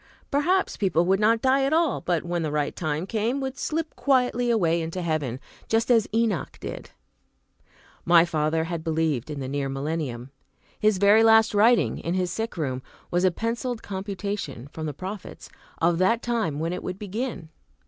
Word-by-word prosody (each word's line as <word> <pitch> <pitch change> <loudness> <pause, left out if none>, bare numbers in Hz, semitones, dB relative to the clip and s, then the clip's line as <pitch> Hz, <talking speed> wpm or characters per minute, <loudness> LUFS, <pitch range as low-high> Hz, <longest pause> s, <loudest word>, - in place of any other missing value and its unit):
Perhaps 355 +7 +1
people 175 -4 +2
would 190 +2 +2
not 225 +2 +3
die 265 +1 +3
at 275 +3 +1
all, 325 -2 +2
but, 175 -3 0
when 175 0 -1
the 155 - -1
right 150 -1 -1
time 155 0 -2
came, 230 +6 -1
would 265 -1 -3
slip 320 +2 -3
quietly 250 -3 +2
away 170 -7 +2
into 165 +3 -4
heaven, 150 -7 -2 0.3
just 225 +2 +2
as 225 -3 +4
Enoch 225 -4 0
did. - - -7 1.1
My 170 -1 +6
father 160 -1 0
had 165 -1 -4
believed 160 -5 -1
in 150 -2 -5
the 130 - -4
near 140 0 -2
millennium. 135 -3 -4 0.5
His 215 -2 +3
very 205 +3 +5
last 225 0 +5
writing, 225 +3 +4
in 170 +2 -2
his 180 -2 0
sick 225 0 -4
room, 130 -5 -2 0.3
was 175 +1 +1
a 185 - +5
penciled 230 +5 -3
computation, 195 - -5
from 155 +1 -5
the 150 - -4
prophets, 190 +4 -8 0.3
of 165 +1 +2
the 190 +6 +4
time 230 -12 -1
when 165 +3 -2
it - - -4
would 185 0 -5
begin. 210 -3 -5
185 Hz, 180 wpm, -25 LUFS, 160-230 Hz, 1.1 s, My